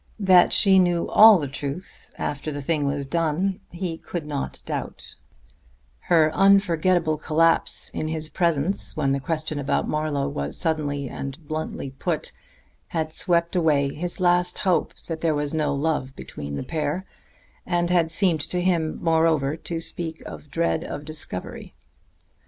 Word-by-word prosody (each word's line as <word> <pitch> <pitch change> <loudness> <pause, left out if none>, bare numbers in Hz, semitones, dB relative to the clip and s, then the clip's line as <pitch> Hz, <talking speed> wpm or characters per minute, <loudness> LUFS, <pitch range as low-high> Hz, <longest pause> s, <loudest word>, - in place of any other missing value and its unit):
That 185 -3 +6
she 195 -2 +6
knew 175 -2 +2
all 215 -1 +8
the 145 -4 -3
truth 145 +5 -6
after 145 +2 -3
the 145 -1 -5
thing 150 -1 0
was 140 0 -2
done, 170 +6 0
he 175 -2 -5
could 170 -4 -5
not 145 -2 -4
doubt; - - -5 1.0
her 160 -3 +5
unforgettable 180 -5 +3
collapse 165 +2 +2
in 155 - -3
his 155 0 -3
presence 170 +1 -1
when 140 -3 +1
the 135 - +1
question 155 +1 -3
about 140 - 0
Marlowe 150 -2 -1
was 70 - -4
suddenly 145 -3 -1
and 135 +4 -7
bluntly 155 -3 -4
put 135 - -3 0.6
had 160 -2 -3
swept 170 +1 +1
away 145 -5 +2
his 175 +4 -5
last 180 0 +2
hope 185 -4 0
that 160 -1 -5
there 160 -2 +1
was 145 0 -2
no 155 -2 0
love 140 -2 -1
between 70 - -7
the - - -4
pair, 155 +5 -2 0.6
and 175 -1 0
had 170 -2 +3
seemed 165 -2 +2
to 170 +3 -3
him, 170 -3 0
moreover, 160 -3 +2
to 165 0 -4
speak 165 0 -5
of 150 - -10
dread 165 +1 0
of 145 - -6
discovery. 155 -12 -6
160 Hz, 150 wpm, -24 LUFS, 145-175 Hz, 1.0 s, all